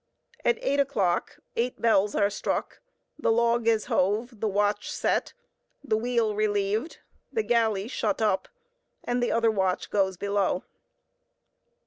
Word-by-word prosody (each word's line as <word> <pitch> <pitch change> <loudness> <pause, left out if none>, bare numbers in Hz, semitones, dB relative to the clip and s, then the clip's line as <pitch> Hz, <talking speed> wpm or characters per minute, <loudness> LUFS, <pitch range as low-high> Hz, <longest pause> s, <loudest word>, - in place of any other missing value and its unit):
At 475 - +3
eight 285 - +1
o'clock, 215 -11 0 0.2
eight 245 +2 -1
bells 210 -3 +3
are 200 0 +2
struck, - - -3 0.4
the 230 - +2
log 235 0 +2
is 225 -2 +3
hove, 215 +5 0
the 220 - 0
watch 205 +1 0
set, - - 0 0.5
the 235 -6 +1
wheel 230 -1 +1
relieved, 210 +5 0 0.3
the 445 - 0
galley 220 - +1
shut 215 -4 -1
up, 210 -4 +1 0.6
and 245 0 -1
the 245 - +1
other 230 -1 +3
watch 190 -3 -1
goes 190 -2 +1
below. 200 -1 0
215 Hz, 135 wpm, -27 LUFS, 200-235 Hz, 0.6 s, At